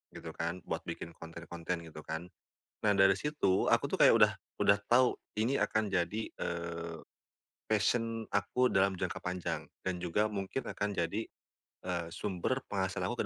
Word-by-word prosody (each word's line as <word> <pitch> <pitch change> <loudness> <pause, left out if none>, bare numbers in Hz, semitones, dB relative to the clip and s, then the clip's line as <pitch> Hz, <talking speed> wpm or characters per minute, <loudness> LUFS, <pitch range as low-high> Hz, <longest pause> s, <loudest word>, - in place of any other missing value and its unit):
gitu - - -7
kan 85 0 -3
buat - - -2
bikin 85 - -5
konten-konten 85 +1 -5
gitu 75 - -9
kan. 85 +2 -4 0.5
Nah 105 - +5
dari 95 -1 +6
situ 145 -7 +1
aku - - +4
tuh - - -1
kayak - - +9
udah - - +7 0.3
udah 100 - +6 0.2
tahu 125 +1 +5 0.2
ini 120 +5 +2
akan 110 -5 +1
jadi, 95 +3 0
eee, 85 -1 -4 0.7
passion 115 +1 +1
aku 115 +5 +2
dalam 95 0 +3
jangka 90 -1 -3
panjang 90 -1 -3 0.2
dan 90 -1 -2
juga 105 +5 +1
mungkin 100 +6 -3
akan 105 -1 -2
jadi, 100 +7 -1 0.6
eee, 85 -2 -2
sumber 105 +7 -1
penghasilan 95 -1 -1
aku - - -1
95 Hz, 155 wpm, -33 LUFS, 85-110 Hz, 0.7 s, kayak